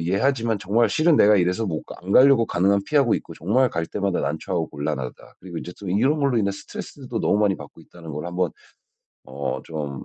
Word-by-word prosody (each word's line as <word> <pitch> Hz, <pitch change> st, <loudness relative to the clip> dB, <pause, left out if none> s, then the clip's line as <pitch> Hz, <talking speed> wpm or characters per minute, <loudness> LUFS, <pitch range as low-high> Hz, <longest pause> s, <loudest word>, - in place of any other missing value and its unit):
이해하지만 110 Hz, +5 st, +1 dB
정말 110 Hz, +5 st, +2 dB
실은 160 Hz, 0 st, +3 dB
내가 105 Hz, -3 st, +6 dB
이래서 90 Hz, +4 st, +1 dB
뭐 80 Hz, -5 st, -2 dB, 0.2 s
안 95 Hz, -, -7 dB
가려고 130 Hz, -3 st, +6 dB
가능한 100 Hz, +3 st, +2 dB
피하고 140 Hz, -6 st, +3 dB
있고 -, -, -5 dB
정말 120 Hz, -, +2 dB
갈 85 Hz, 0 st, -2 dB
때마다 100 Hz, -2 st, -1 dB
난처하고 80 Hz, +2 st, -2 dB
곤란하다." 65 Hz, -3 st, -5 dB
그리고 85 Hz, -3 st, -7 dB
인제 90 Hz, -, -7 dB
또 100 Hz, -, -7 dB
이런 130 Hz, -, +2 dB
걸로 140 Hz, -4 st, +1 dB
인해 100 Hz, -2 st, +1 dB
스트레스도 100 Hz, -, -9 dB
또 -, -, -2 dB
너무 105 Hz, -, +2 dB
많이 105 Hz, -2 st, +2 dB
받고 -, -, -12 dB
있다는 80 Hz, -2 st, -12 dB
걸 75 Hz, +3 st, -5 dB
1 90 Hz, 0 st, -6 dB
번 90 Hz, -3 st, +1 dB, 0.7 s
어 70 Hz, +1 st, -4 dB
좀 75 Hz, -4 st, -5 dB
95 Hz, 430 characters per minute, -23 LUFS, 85-115 Hz, 0.7 s, 내가